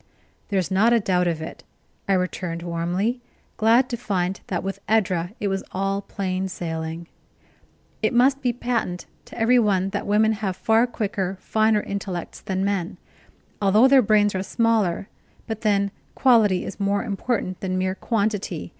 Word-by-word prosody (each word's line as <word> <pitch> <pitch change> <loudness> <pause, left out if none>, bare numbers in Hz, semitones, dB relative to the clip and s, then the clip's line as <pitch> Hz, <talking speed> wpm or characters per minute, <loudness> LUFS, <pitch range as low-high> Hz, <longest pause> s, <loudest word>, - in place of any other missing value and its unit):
"There's 190 -2 0
not 215 +5 +4
a 235 - +5
doubt 180 -3 +1
of 160 -2 -2
it!" - - -9 0.5
I - - +4
returned 180 -2 -2
warmly, 175 +8 -1 0.3
glad 230 +4 +4
to 240 - -3
find 190 -4 -2
that 180 -2 -2
with 195 +1 -4
Edra 185 -4 +1
it 205 - -1
was 195 -1 -1
all 195 +1 -1
plain 190 -1 -3
sailing. 165 -2 -5 1.0
"It - - +2
must 265 +3 +3
be 250 -2 +1
patent 235 -7 -2 0.2
to - - -12
every 240 +2 +4
one 195 -4 +2
that 205 +1 -4
women 215 +2 +3
have 205 -4 -2
far 225 +3 +3
quicker, 195 -5 -3
finer 220 0 +2
intellects 195 -4 -5
than 190 0 -2
men, 195 -4 -2 0.6
although 210 +5 +5
their 270 -1 +6
brains 205 -2 +3
are 185 - -1
smaller; 210 -3 +1 0.4
but 220 -2 -5
then 200 -2 +1 0.2
quality 220 -8 +4
is - - -7
more 200 0 +1
important 205 -3 -2
than 185 -1 -2
mere 185 0 0
quantity. 210 0 -2
200 Hz, 160 wpm, -23 LUFS, 185-220 Hz, 1.0 s, their